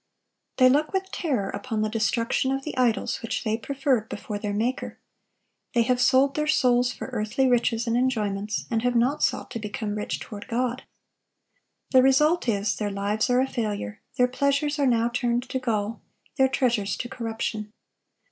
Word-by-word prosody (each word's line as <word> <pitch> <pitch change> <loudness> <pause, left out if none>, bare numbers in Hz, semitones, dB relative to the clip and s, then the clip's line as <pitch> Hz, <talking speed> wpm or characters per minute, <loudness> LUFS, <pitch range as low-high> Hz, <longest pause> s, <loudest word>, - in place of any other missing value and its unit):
They 255 - +7
look 295 +6 +2
with 380 0 -2
terror 255 - -1
upon 215 +1 -3
the - - +1
destruction 230 +4 0
of 270 0 -2
the 305 - -5
idols 245 -3 +1
which 230 - -3
they 220 -2 0
preferred 260 -2 -1
before 205 0 -5
their 205 -1 -3
Maker. 235 +6 -2 0.8
They 235 - +5
have 250 +1 +1
sold 265 +2 +4
their 300 +1 -1
souls 250 -4 +3
for - - -7
earthly 215 +5 0
riches 235 -1 +2
and 230 0 0
enjoyments, 215 -5 -1
and 225 -1 +1
have 245 0 0
not 255 +5 +2
sought - - 0
to 235 - -4
become 210 0 -4
rich 210 0 -3
toward 210 -2 -9
God. 250 +2 -2 1.1
The 260 - +7
result 300 +5 +3
is, 205 -1 0
their 210 -1 -1
lives 205 +4 -1
are 250 +1 +4
a 265 - +1
failure; 210 - -3 0.2
their 250 - +4
pleasures 280 +3 0
are 280 - +3
now 235 -2 +3
turned 240 0 -1
to 260 - -1
gall, 225 -3 -2 0.3
their 265 -2 +4
treasures 235 -6 0
to 240 - -4
corruption. 225 -4 -4
240 Hz, 175 wpm, -25 LUFS, 215-260 Hz, 1.1 s, They